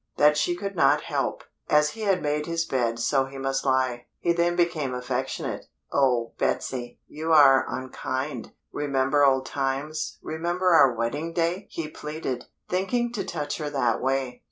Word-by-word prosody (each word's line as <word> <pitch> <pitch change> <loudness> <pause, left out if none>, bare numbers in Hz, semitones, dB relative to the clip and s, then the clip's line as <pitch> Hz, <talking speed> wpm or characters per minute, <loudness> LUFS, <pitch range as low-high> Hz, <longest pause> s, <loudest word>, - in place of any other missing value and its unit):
That 150 0 +5
she 175 +3 +1
could 200 +2 -5
not - - +4
help; - - -2 0.3
as 150 0 +4
he 225 - -9
had 195 -3 +1
made 150 0 -1
his 165 -1 -1
bed 120 -5 0
so 135 +3 +2
he 135 +1 -10
must 135 0 -1
lie. 130 -2 +1
He 170 - +1
then 170 0 +1
became 160 -7 0
affectionate. 125 0 -3 0.3
"Oh 125 -4 +2
Betsy, 120 -2 -2
you 160 +2 -4
are 140 -4 +7
unkind: 130 0 -4 0.2
remember 140 0 +1
old 135 -1 +4
times, 140 +3 -2
remember 175 +3 -1
our 160 -6 +7
wedding 145 +9 -2
day!" 170 +2 -1
he 165 -2 -4
pleaded, 150 -5 -5 0.2
thinking 235 +6 0
to 205 -4 -2
touch 145 -3 -4
her 150 -1 -3
that 125 -5 0
way. 130 -1 -1
145 Hz, 160 wpm, -26 LUFS, 130-165 Hz, 0.3 s, are